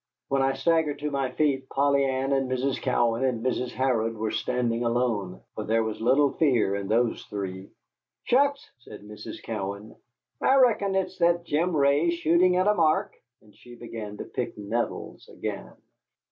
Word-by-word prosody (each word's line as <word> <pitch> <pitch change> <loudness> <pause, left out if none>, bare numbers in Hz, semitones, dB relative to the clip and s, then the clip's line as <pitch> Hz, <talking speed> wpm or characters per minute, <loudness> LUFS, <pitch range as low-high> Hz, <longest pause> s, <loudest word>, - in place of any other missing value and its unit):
When 135 0 +1
I 135 0 +2
staggered 150 +1 +1
to 150 +1 -3
my 135 -2 -1
feet 135 -1 0
Polly 140 0 +2
Ann 135 0 0
and 135 -1 0
Mrs. 130 +1 -1
Cowan 120 -1 +1
and 125 -3 -1
Mrs. 125 -1 -1
Harrod 115 -4 0
were 110 0 -2
standing 120 +1 -1
alone. 115 -6 -1
For 110 - -5
there 115 +1 +1
was 110 -1 -4
little 135 +5 +4
of - - -13
fear 120 -10 +3
in 100 -1 -4
those 115 +2 +1
three. 95 -2 -6 0.5
"Shucks!" 280 +2 +1
said 105 -4 -12
Mrs. 105 0 -9
Cowan, 100 -1 -5 0.5
"I 265 - +4
reckon 225 -7 +3
it's 190 -1 -2
that 170 0 +2
Jim 165 +2 0
Ray 140 +4 +3
shooting 170 +2 +3
at 185 +1 +2
a 210 - +4
mark," 175 +3 +2 0.3
and 105 -1 -21
she 120 0 -14
began 110 -3 -8
to - - -5
pick - - -5
nettles 110 +3 -4
again. - - -6
130 Hz, 175 wpm, -26 LUFS, 115-155 Hz, 0.5 s, little